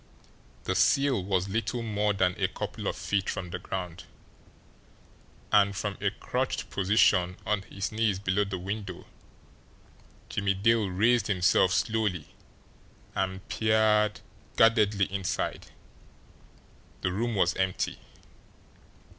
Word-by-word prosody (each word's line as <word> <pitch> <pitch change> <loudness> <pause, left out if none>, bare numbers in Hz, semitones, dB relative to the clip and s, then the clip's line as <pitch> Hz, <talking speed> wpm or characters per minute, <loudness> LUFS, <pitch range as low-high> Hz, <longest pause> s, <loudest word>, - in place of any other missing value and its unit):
The - - -1
sill 135 -8 +3
was 95 -1 0
little 115 +3 -2
more 105 -1 0
than 95 -2 +1
a - - +3
couple - - -5
of - - -1
feet 100 -1 -1
from 90 -2 -4
the 90 - -4
ground, 90 -1 -6 1.5
and, 100 -1 +4
from 100 +1 -3
a 100 - +2
crouched 125 +5 -3
position 90 -2 +3
on 105 -2 0
his 100 -1 -5
knees 110 -3 +1
below 100 +1 +1
the 100 -2 -4
window, 95 0 -6 1.2
Jimmie 100 -1 0
Dale 110 +1 +2
raised 110 +4 +2
himself 95 -2 +3
slowly 105 -6 -1 0.8
and 95 +1 -3
peered 110 -1 +2 0.3
guardedly 105 -3 +4
inside. 95 -2 -2 1.3
The 90 - 0
room 115 +4 -1
was 90 -3 +2
empty. 95 0 -1
100 Hz, 115 wpm, -28 LUFS, 95-110 Hz, 1.5 s, and